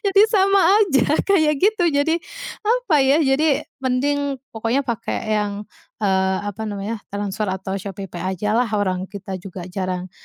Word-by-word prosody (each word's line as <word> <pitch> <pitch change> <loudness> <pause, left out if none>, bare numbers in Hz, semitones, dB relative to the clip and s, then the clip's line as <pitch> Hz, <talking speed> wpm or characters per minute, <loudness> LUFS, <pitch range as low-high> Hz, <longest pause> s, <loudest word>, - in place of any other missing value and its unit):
Jadi, 400 0 +5
sama 395 -1 +4 0.2
aja, 285 - +3 0.2
kayak 315 -6 +4
gitu. 405 -3 +3
Jadi, 285 +4 +2 0.5
apa 465 -9 +3
ya, 275 +3 +4
jadi 280 +1 +2 0.2
mending, 275 +2 0
pokoknya 230 +5 0
pakai 235 -4 -3 0.2
yang, 205 -1 -1 0.5
eee, 190 -1 +2
apa 205 +2 -5
namanya, 205 +2 -4 0.2
transfer 205 +1 -2
atau 190 0 -3
ShopeePay 190 -2 -7
ajalah. 215 +6 +1
Orang 185 -2 0
kita 195 -1 -7
juga 180 -1 -8
jarang 185 -1 -3
225 Hz, 140 wpm, -21 LUFS, 195-290 Hz, 0.5 s, Jadi